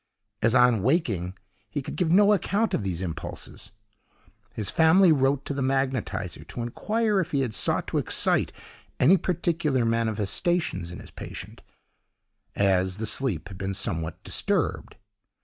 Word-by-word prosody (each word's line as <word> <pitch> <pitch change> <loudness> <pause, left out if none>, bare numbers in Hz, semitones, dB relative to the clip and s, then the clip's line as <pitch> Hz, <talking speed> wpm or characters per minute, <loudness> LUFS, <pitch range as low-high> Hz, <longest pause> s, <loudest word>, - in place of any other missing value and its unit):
As, 115 +2 +3
on 125 -4 +5
waking, 100 - 0 0.3
he 145 - -4
could - - -6
give 175 -4 0
no 205 +3 +6
account 205 +2 0
of - - +1
these 95 -2 -3
impulses, 85 -1 -6 0.8
his 105 -3 -3
family 165 +3 +5
wrote 135 -1 +2
to - - -3
the 140 - -3
magnetiser 130 -8 -1
to 120 - -6
inquire 210 - 0
if 175 - -3
he 140 - +2
had 125 -5 -2
sought - - 0
to - - 0
excite - - +2 0.5
any 160 +9 +6
particular 165 -7 0
manifestations 115 - 0
in 90 - -8
his - - -11
patient, - - -8 0.9
as 95 -1 +2
the 110 - -3
sleep 105 - -1
had 95 -2 -10
been 95 0 -3
somewhat 80 -3 -3
disturbed. - - -1
130 Hz, 150 wpm, -26 LUFS, 95-165 Hz, 0.9 s, no